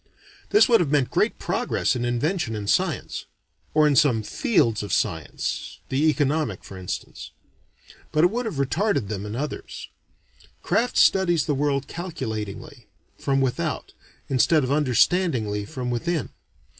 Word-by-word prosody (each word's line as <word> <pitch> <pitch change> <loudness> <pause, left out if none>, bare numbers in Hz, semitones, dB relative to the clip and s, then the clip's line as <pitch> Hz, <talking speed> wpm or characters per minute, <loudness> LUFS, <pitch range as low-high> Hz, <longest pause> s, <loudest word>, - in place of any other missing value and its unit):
This 415 - +6
would 235 -2 +5
have 165 - +1
meant 140 -3 +1
great - - +1
progress - - 0
in 120 -1 -2
invention 120 - -1
and 105 -1 -5
science - - -1 0.5
or 155 0 +5
in 145 - +2
some 130 -7 +4
fields 115 - +1
of 100 -2 -6
science, 80 -4 -2
the 145 +4 +2
economic 145 - 0
for 95 - -10
instance. 95 -1 -6 0.8
But 155 - +2
it 175 - +5
would 240 +1 -2
have 205 - -4
retarded 140 - 0
them 105 -1 -4
in 105 - -5
others. 145 +4 -5 0.7
Craft 245 +2 +1
studies 175 -5 +4
the 150 - 0
world 140 0 0
calculatingly, 120 - -6 0.3
from 135 -1 +1
without, 130 -2 -2 0.3
instead 140 +4 +3
of 130 - -1
understandingly 130 - +2
from 125 +3 -4
within. 165 +7 -1
140 Hz, 145 wpm, -24 LUFS, 115-160 Hz, 0.8 s, This